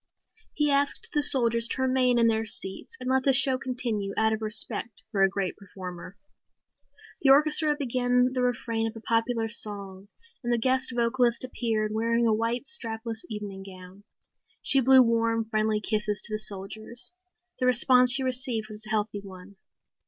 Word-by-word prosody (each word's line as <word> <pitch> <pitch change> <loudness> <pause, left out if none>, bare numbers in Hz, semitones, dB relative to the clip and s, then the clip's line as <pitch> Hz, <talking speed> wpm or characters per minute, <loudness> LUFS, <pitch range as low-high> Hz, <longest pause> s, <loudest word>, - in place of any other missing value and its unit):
He 295 -1 +1
asked 280 0 0
the 295 - +1
soldiers 235 -5 +6
to 260 - -3
remain 255 -1 +1
in 235 - +3
their 225 -1 +1
seats 190 -3 -5
and 255 - -7
let 260 0 +1
the 270 - +3
show 265 -1 +3
continue 235 -6 -4
out 220 0 +2
of 220 - -4
respect 220 +1 -1
for 200 -4 -1
a 195 - +4
great 190 -1 -3
performer. 185 -1 -10 1.0
The 275 - +2
orchestra 300 +2 +4
began 250 -1 0
the 255 - -2
refrain 230 -2 -2
of 225 - -8
a - - -8
popular 230 +1 -1
song 200 -3 -5 0.4
and 240 - -2
the 240 - +2
guest 260 +2 +2
vocalist 240 0 +1
appeared 225 -4 -3
wearing 230 +2 0
a 225 - +2
white 230 +4 -2
strapless 225 - -4
evening 205 -3 -7
gown. 190 0 -13 0.6
She 270 - +3
blew 260 +1 +6
warm, 230 -1 0
friendly 215 -1 -1
kisses 210 -1 -2
to 215 - -3
the 215 - -2
soldiers. 215 - +2 0.5
The 255 - 0
response 250 0 +4
she 270 +1 +3
received 250 -4 -3
was 215 0 -9
a - - -10
healthy 210 -1 -2
one. 190 0 -14
230 Hz, 170 wpm, -26 LUFS, 215-255 Hz, 1.0 s, soldiers